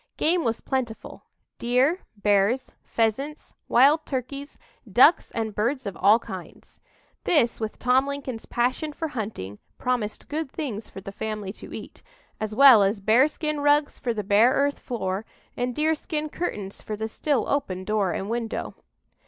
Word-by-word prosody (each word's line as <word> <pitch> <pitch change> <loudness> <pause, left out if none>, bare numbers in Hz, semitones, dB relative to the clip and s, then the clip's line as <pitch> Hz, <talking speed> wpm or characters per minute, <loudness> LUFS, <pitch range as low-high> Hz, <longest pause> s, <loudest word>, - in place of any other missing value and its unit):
Game 340 +2 +2
was 230 -2 -1
plentiful 250 -4 -4 0.3
deer, 255 +9 +2 0.2
bears, 205 +5 +2
pheasants, 265 +7 -2
wild 285 +6 +5
turkeys, 275 +1 -5 0.3
ducks 265 - +6
and 220 -2 -3
birds 245 +5 -1
of 200 -3 -4
all 205 +3 +5
kinds. 230 - -10 0.4
This, 245 -9 +2
with 220 -1 -4
Tom 255 +2 +3
Lincoln's 275 -5 -5
passion 255 +5 -1
for 320 +1 -4
hunting, 205 - -5 0.2
promised 245 -4 -2
good 305 -2 -3
things 230 -9 -5
for 195 - -9
the 195 - -8
family 210 -1 -4
to - - -12
eat, - - -9 0.4
as 215 0 -3
well 265 -4 +9
as 200 +2 +2
bearskin 290 +8 +2
rugs 290 +1 +2
for 245 - -1
the 215 -2 -3
bare 210 +5 +5
earth 285 +1 +1
floor, 195 -5 -3 0.3
and 245 0 -2
deerskin 310 0 -1
curtains 205 - -4
for 215 - -5
the 220 +1 -3
still 275 +3 -1
open 185 -10 -1
door 205 -2 0
and 195 - -3
window. 230 0 -3
240 Hz, 155 wpm, -25 LUFS, 215-285 Hz, 0.4 s, well